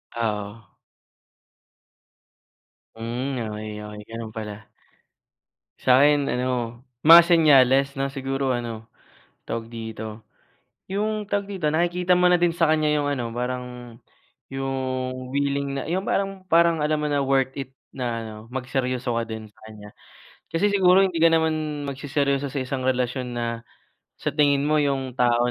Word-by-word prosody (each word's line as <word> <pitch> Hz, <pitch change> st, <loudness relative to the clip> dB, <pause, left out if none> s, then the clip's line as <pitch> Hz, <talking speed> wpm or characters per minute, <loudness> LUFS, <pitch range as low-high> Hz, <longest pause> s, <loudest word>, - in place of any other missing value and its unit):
Oo. 110 Hz, -1 st, -3 dB, 2.3 s
Mm 120 Hz, +1 st, -3 dB
okay 105 Hz, 0 st, -6 dB, 0.2 s
okay 105 Hz, 0 st, -8 dB
ganun 115 Hz, -1 st, -7 dB
pala. 105 Hz, -1 st, -7 dB, 1.2 s
Sa'kin 140 Hz, +3 st, +4 dB
ano 120 Hz, -2 st, -2 dB, 0.2 s
mga 165 Hz, +2 st, +11 dB
senyales 140 Hz, -5 st, +5 dB
na 135 Hz, -1 st, -2 dB
siguro 135 Hz, 0 st, -2 dB
ano, 115 Hz, -2 st, -4 dB, 0.6 s
tawag 115 Hz, 0 st, -4 dB
dito? 110 Hz, -1 st, -7 dB, 0.6 s
Yung, 210 Hz, +2 st, -1 dB
tawag 200 Hz, -1 st, 0 dB
dito, 185 Hz, -7 st, -2 dB
nakikita 175 Hz, +3 st, +2 dB
mo 180 Hz, -, +4 dB
na 180 Hz, -, +5 dB
din 175 Hz, 0 st, +2 dB
sa 165 Hz, 0 st, +2 dB
kanya 155 Hz, -1 st, +2 dB
yung 145 Hz, -, -1 dB
ano 130 Hz, -5 st, -2 dB
parang 125 Hz, 0 st, -5 dB, 0.5 s
yung, 130 Hz, -1 st, -3 dB
willing 140 Hz, 0 st, -1 dB
na -, -, -2 dB
yung 180 Hz, +4 st, -1 dB
parang 195 Hz, -1 st, -1 dB
parang 165 Hz, -1 st, +4 dB
alam 150 Hz, 0 st, +1 dB
mo 150 Hz, -, -1 dB
na 145 Hz, -1 st, +1 dB
worth 135 Hz, -1 st, +1 dB
it 135 Hz, -2 st, -6 dB, 0.2 s
na 130 Hz, -2 st, -3 dB, 0.2 s
ano 110 Hz, -1 st, -8 dB, 0.2 s
magseryoso 125 Hz, -1 st, -2 dB
ka 115 Hz, -, 0 dB
din 110 Hz, 0 st, -6 dB
sa -, -, -33 dB
kanya. 105 Hz, -1 st, -12 dB, 0.6 s
Kasi 200 Hz, +5 st, +2 dB
siguro 190 Hz, -1 st, +5 dB
hindi 185 Hz, -3 st, 0 dB
ka 165 Hz, -, +6 dB
naman 155 Hz, -2 st, 0 dB
magseseryoso 140 Hz, 0 st, -1 dB
sa 140 Hz, -, -2 dB
isang 130 Hz, 0 st, -3 dB
relasyon 125 Hz, -1 st, -1 dB
na 120 Hz, -1 st, -2 dB, 0.7 s
sa -, -, -3 dB
tingin 145 Hz, -2 st, +3 dB
mo 150 Hz, +1 st, +2 dB
yung 135 Hz, -3 st, 0 dB
tao 120 Hz, 0 st, +3 dB
135 Hz, 140 wpm, -24 LUFS, 120-155 Hz, 2.3 s, mga